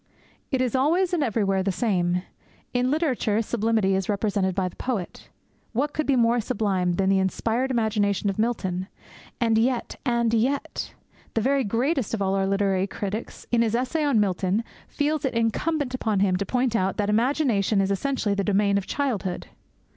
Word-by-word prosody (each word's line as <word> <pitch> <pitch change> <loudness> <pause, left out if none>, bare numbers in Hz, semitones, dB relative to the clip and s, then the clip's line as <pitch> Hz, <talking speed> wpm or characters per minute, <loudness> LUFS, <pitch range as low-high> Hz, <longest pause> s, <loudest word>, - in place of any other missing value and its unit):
It 265 -2 0
is 250 -3 0
always 340 +8 +2
and 330 -4 +2
everywhere 200 -5 +1
the 195 +1 0
same. 180 -3 0 0.5
In 250 0 +1
literature 260 -8 +1
sublimity 220 -3 +1
is 190 0 -1
represented 200 -2 0
by 190 -2 0
the 180 - -9
poet. 225 -9 -4 0.4
What 285 +6 0
could 310 - -2
be 275 - +3
more 235 0 +3
sublime 200 -6 0
than 190 +2 0
the 195 0 +4
inspired 225 +7 0
imagination 215 -4 +1
of 195 +1 -1
Milton? 190 -5 -1 0.5
And 225 -2 +3
yet, 245 +1 0
and 235 -3 +1
yet! 255 +5 -1 0.4
The 225 - +2
very 270 +3 +2
greatest 245 +3 0
of - - -6
all 190 0 +1
our 195 0 +1
literary 195 -1 +1
critics, 205 +3 -5
in 235 -1 +3
his 230 -1 +1
essay 260 +6 0
on 280 -7 +3
Milton, 195 +1 +1 0.2
feels 300 0 -1
it 270 - -1
incumbent 255 +5 0
upon 220 -5 0
him 190 -2 +3
to 200 - -3
point 250 -2 0
out 190 -3 0
that 205 - 0
imagination 225 -4 +2
is 195 0 +1
essentially 225 0 0
the 200 0 0
domain 200 0 +2
of 190 - -9
childhood. 225 -10 -2
220 Hz, 175 wpm, -25 LUFS, 195-255 Hz, 0.5 s, the